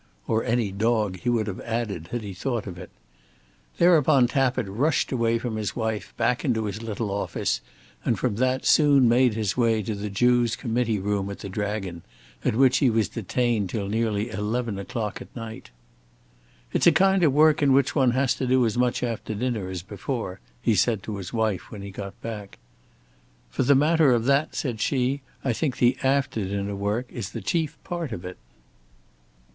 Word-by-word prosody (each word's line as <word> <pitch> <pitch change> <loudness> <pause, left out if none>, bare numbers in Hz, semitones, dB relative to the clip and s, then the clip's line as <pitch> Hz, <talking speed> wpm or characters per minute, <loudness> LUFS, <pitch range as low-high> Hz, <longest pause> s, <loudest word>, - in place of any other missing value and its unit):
"Or 110 0 +1
any 115 -3 0
dog," 105 -2 0
he 120 - -1
would 115 -3 +1
have 100 -3 -5
added, 110 -8 -3
had 120 +4 -4
he 100 -2 -6
thought 115 +4 -3
of 90 -4 -7
it. - - -9 0.9
Thereupon 155 -6 +5
Tappitt 130 -3 +1
rushed 130 +11 0
away 115 -3 +1
from 115 -2 -4
his 105 -2 -3
wife, 110 -4 -3
back 125 - +1
into 115 -6 0
his 105 +1 -4
little 110 -2 -3
office, 100 +1 -1 0.4
and - - +1
from 100 - -1
that 130 +2 +1
soon 145 -4 +5
made 120 -1 +4
his 110 -3 -1
way 115 -3 +2
to 110 - -3
the 105 +1 -4
Jew's 120 +3 +2
committee 115 -2 -1
room 100 0 -1
at 100 - -6
the 100 - -7
Dragon, 100 -3 -3 0.4
at - - +1
which 130 +1 +4
he 135 - +4
was 110 -4 +1
detained 115 -2 -1
till 100 -1 -3
nearly 110 +1 -1
eleven 110 0 -2
o'clock 105 +2 -4
at - - -12
night. 115 -2 -8 1.0
"It's - - +3
a - - +9
kind 195 0 +3
of 155 - +5
work 150 +2 +4
in 140 -2 +4
which 135 0 +3
one 135 -4 +4
has 130 +1 +2
to 130 - -2
do 130 -1 +4
as 110 - 0
much 125 0 +1
after 115 -2 -3
dinner 110 -4 -2
as 90 -2 -5
before," 105 0 -5 0.2
he 115 - +3
said 105 0 +2
to 105 -2 -5
his 95 -2 -7
wife 110 -5 -1
when 100 -2 -8
he 100 - -7
got 100 0 -8
back. 105 -3 -6 0.9
"For - - -1
the 135 +2 +5
matter 150 -1 +4
of 115 -1 +1
that," 140 +3 +2
said 120 -6 -3
she, 135 +2 0 0.2
"I 130 - +2
think 135 +2 -2
the 125 +1 +4
after 135 -5 +1
dinner 100 +1 -3
work 105 +5 -1
is 105 -4 -6
the 115 - -5
chief 160 - -1
part 170 -6 -4
of 90 -5 -6
it." 90 0 -7
115 Hz, 195 wpm, -25 LUFS, 105-130 Hz, 1.0 s, a